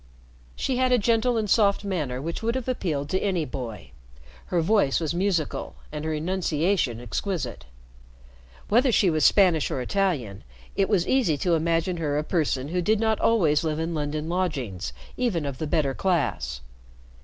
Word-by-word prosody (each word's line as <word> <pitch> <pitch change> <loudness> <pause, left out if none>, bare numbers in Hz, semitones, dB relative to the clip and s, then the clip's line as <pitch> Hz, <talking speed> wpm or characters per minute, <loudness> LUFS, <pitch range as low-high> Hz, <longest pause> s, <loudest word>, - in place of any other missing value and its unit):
She 255 - -1
had 255 0 +2
a 250 - +5
gentle 230 +2 +2
and 215 -1 0
soft 200 -1 +3
manner 155 -11 -2
which 165 +5 -4
would 230 +2 -1
have 260 -2 -3
appealed 160 - -1
to 190 - +1
any 185 -6 0
boy. 120 - -7 0.6
Her 175 - 0
voice 170 -5 +2
was 160 -2 -2
musical 175 -3 -1 0.2
and 150 0 -5
her 160 - -1
enunciation 165 - 0
exquisite. 130 - -4 1.0
Whether 245 +4 +4
she 195 -5 +3
was 155 -1 +1
Spanish 180 -7 +4
or - - -2
Italian, 130 - -1 0.3
it 195 - +1
was 190 -5 +2
easy 235 - +2
to 175 - +3
imagine 165 +2 +1
her 150 -3 -1
a 150 - 0
person 150 -5 -1
who 180 +2 0
did 215 +4 +2
not 220 -1 +1
always 160 -10 +3
live 155 -2 -1
in 165 +1 -2
London 150 0 -2
lodgings, 145 - -2 0.3
even 210 -12 0
of 140 -2 -5
the 155 - -2
better 145 -2 +1
class. 135 - -1
170 Hz, 170 wpm, -25 LUFS, 145-200 Hz, 1.0 s, a